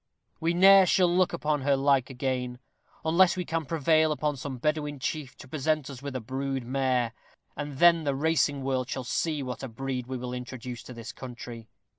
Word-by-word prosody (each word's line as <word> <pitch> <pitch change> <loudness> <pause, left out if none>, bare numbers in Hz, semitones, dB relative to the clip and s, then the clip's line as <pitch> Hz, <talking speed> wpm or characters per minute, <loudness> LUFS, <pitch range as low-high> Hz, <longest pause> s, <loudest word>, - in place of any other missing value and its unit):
We 165 +1 0
ne'er 195 +1 +8
shall 175 -2 +3
look 185 -1 +3
upon 150 -3 -1
her 140 +1 +3
like 135 -2 +2
again, 125 -1 -2 0.5
unless 175 +3 +4
we 180 - -2
can 165 0 -2
prevail 160 +1 +3
upon 150 -1 -1
some 130 0 -6
Bedouin 150 +1 -1
chief 135 +1 -4
to 135 - -12
present 150 0 -1
us 130 -2 -9
with 140 -2 -6
a - - -1
brood 135 +2 -3
mare, 125 -2 0 0.4
and 145 -2 -5
then 170 +1 +6
the 140 -2 0
racing 145 -2 +1
world 130 -2 -1
shall 130 - -3
see 150 +3 -1
what 125 -1 -5
a 135 - -4
breed 125 +1 -4
we 130 0 -3
will 125 0 -5
introduce 125 -1 -6
into 125 - -11
this 115 -1 -7
country. 120 -3 -9
135 Hz, 195 wpm, -28 LUFS, 130-155 Hz, 0.5 s, ne'er